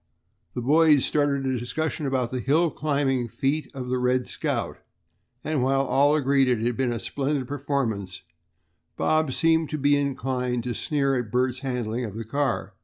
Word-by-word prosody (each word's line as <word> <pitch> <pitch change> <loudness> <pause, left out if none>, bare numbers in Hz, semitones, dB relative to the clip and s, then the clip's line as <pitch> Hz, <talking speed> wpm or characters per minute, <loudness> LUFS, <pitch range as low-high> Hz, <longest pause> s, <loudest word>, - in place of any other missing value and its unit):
The 125 - -3
boys 150 +1 +5
started 145 -2 +1
a 130 -2 0
discussion 155 +4 -3
about 130 -3 -1
the 130 - -2
hill 155 +6 +2
climbing 140 -5 0
feat 135 +5 -1
of 125 -2 -5
the 125 0 0
"Red 125 0 +1
Scout," - - -3 0.6
and 155 -3 -1
while 135 +1 +2
all 140 +3 +3
agreed 140 -2 +3
that 125 -2 +2
it 115 - -2
had 120 -1 0
been 130 -1 0
a 120 - -2
splendid 140 +1 -2
performance, 125 - -3 0.7
Bob 155 -3 +1
seemed 160 +2 +2
to 155 - -3
be 145 0 +3
inclined 130 -3 -1
to 125 0 -3
sneer 140 +3 0
at 115 -4 -5
Bert's 125 0 0
handling 125 -3 -3
of 105 -4 -6
the 115 0 -5
car. 140 +2 -1
135 Hz, 180 wpm, -25 LUFS, 125-145 Hz, 0.7 s, boys